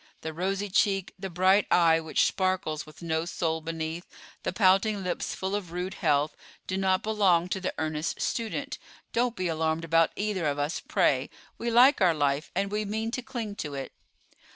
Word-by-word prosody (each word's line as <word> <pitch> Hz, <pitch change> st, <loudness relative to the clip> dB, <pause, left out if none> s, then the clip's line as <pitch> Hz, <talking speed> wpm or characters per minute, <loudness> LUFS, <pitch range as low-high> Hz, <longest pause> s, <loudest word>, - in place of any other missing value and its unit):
The 160 Hz, -, -5 dB
rosy 195 Hz, +4 st, -1 dB
cheek, 195 Hz, -1 st, +1 dB
the 195 Hz, 0 st, -4 dB
bright 185 Hz, +3 st, +3 dB
eye 165 Hz, -2 st, +5 dB
which 160 Hz, -1 st, +1 dB
sparkles 185 Hz, -5 st, -1 dB
with 155 Hz, +3 st, -13 dB
no 160 Hz, -1 st, 0 dB
soul 160 Hz, -2 st, -2 dB
beneath, 160 Hz, +1 st, -4 dB, 0.3 s
the -, -, -2 dB
pouting 195 Hz, +2 st, +3 dB
lips 180 Hz, -1 st, -2 dB
full 190 Hz, +1 st, -3 dB
of 200 Hz, -5 st, -3 dB
rude 180 Hz, +2 st, -3 dB
health, 145 Hz, +1 st, +1 dB, 0.3 s
do 190 Hz, -, -3 dB
not 190 Hz, -1 st, +1 dB
belong 195 Hz, -6 st, +3 dB
to 190 Hz, -, -2 dB
the 185 Hz, -, -1 dB
earnest 155 Hz, 0 st, -2 dB
student. 245 Hz, +5 st, -3 dB, 0.3 s
Don't 240 Hz, 0 st, +1 dB
be 185 Hz, -1 st, -1 dB
alarmed 160 Hz, 0 st, -1 dB
about 165 Hz, 0 st, +4 dB
either 200 Hz, -6 st, -1 dB
of 145 Hz, 0 st, -1 dB
us, 145 Hz, +3 st, -1 dB
pray; -, -, +1 dB, 0.3 s
we 235 Hz, -, -1 dB
like 245 Hz, +2 st, +6 dB
our 175 Hz, -3 st, +4 dB
life, 145 Hz, 0 st, 0 dB
and 195 Hz, +2 st, 0 dB
we 210 Hz, +1 st, 0 dB
mean 220 Hz, +2 st, -2 dB
to 255 Hz, -, -3 dB
cling 240 Hz, -5 st, -5 dB
to 145 Hz, -2 st, -4 dB
it." 135 Hz, -1 st, -5 dB
185 Hz, 185 wpm, -28 LUFS, 160-205 Hz, 0.3 s, like